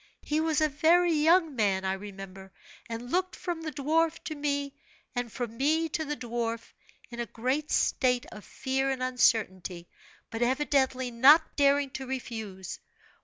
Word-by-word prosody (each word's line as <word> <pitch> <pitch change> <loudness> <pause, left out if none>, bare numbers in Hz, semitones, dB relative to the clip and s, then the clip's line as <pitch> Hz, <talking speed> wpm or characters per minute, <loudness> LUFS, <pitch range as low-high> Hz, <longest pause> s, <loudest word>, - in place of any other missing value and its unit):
He 300 +1 0
was 315 -1 +1
a 310 - +4
very 330 +4 +3
young 320 0 +3
man, 195 -4 +1
I 190 - +1
remember, 195 -1 -9 0.4
and 235 +2 -6
looked 370 0 0
from 345 -2 -4
the 315 -1 -4
dwarf 320 +3 +1
to 315 - -4
me, 285 -1 -2 0.4
and 245 -2 -2
from 235 -2 -5
me 315 +5 +1
to 315 +1 -2
the 295 -1 -4
dwarf, 230 -1 -4 0.4
in 235 - -8
a 235 - -2
great 260 +7 -2
state 250 -1 +2
of 210 - -10
fear 265 0 -2
and 260 -1 -2
uncertainty, 190 -8 +1 0.4
but 225 0 -4
evidently 260 0 +1
not 280 +7 +6
daring 280 -1 +3
to 265 0 -6
refuse. 220 -8 -6
265 Hz, 160 wpm, -28 LUFS, 230-300 Hz, 0.4 s, not